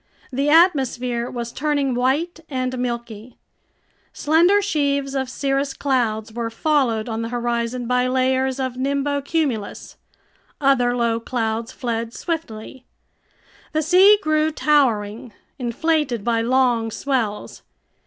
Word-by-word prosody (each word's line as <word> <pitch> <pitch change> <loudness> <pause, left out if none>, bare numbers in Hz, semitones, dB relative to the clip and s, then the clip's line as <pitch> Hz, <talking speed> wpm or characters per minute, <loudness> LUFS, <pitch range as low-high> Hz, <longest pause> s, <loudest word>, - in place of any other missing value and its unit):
The 280 +3 0
atmosphere 260 -7 +2
was 235 -1 -5
turning 285 -2 0
white 275 +8 0
and 255 -2 -2
milky. 235 -1 -5 0.8
Slender 340 +7 +3
sheaves 280 -8 0
of 265 -2 -2
cirrus 275 +1 -1
clouds 225 -5 -1
were 230 0 -3
followed 245 -4 0
on 225 -1 -3
the 230 - -4
horizon 240 0 -2
by 250 +1 +1
layers 260 +1 +1
of 260 -1 -3
nimbocumulus. 280 -3 -2 0.6
Other 250 -4 +2
low 230 -1 +1
clouds 230 -1 -3
fled 230 -1 -4
swiftly. 265 -7 -5 0.9
The 310 0 +1
sea 375 +6 +6
grew 310 0 +2
towering, 235 -8 +1 0.3
inflated 255 -1 0
by 230 0 +1
long 240 -2 +2
swells. 230 -4 -3
255 Hz, 115 wpm, -21 LUFS, 235-285 Hz, 0.9 s, sea